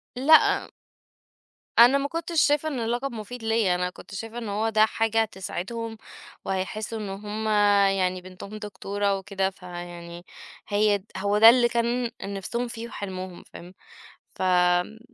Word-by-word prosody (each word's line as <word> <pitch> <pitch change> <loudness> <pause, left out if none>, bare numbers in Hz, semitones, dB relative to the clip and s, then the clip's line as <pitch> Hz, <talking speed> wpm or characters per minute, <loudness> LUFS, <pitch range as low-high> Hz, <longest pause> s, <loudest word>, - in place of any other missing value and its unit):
لأ 290 +6 +5 1.1
أنا 245 +4 +8
ما 280 0 -1
كنتش 330 +1 -1
شايفة 295 +1 +2
إن 275 -5 -4
اللقب 240 +4 -2
مفيد 225 +2 -8
ليّا، 225 -5 +2
أنا 180 0 -1
كنت 190 - -12
شايفة 225 +4 -6
إن 225 -3 -5
هو 215 +2 0
ده 215 0 +5
حاجة 225 0 +1
هتسعدهم، 225 +2 -5 0.5
وهيحسوا 215 +4 -3
إن 205 - -5
هُم 210 +2 -5 0.5
يعني 185 -1 0
بنتهم 185 +3 -10
دكتورة 200 -1 -2
وكده 190 0 -2
فيعني 175 -1 -9 0.4
هي 205 -1 +2
هو 200 +2 +1
ده 225 +2 +10
اللي 240 0 +5
كان 235 0 0
نِفسهم 200 +5 -3
فيه 230 0 -7
وحلمهم، 185 -4 -7
فاهم؟ 175 +2 -13 0.6
فآمم 180 +3 +2
210 Hz, 140 wpm, -25 LUFS, 190-235 Hz, 1.1 s, ده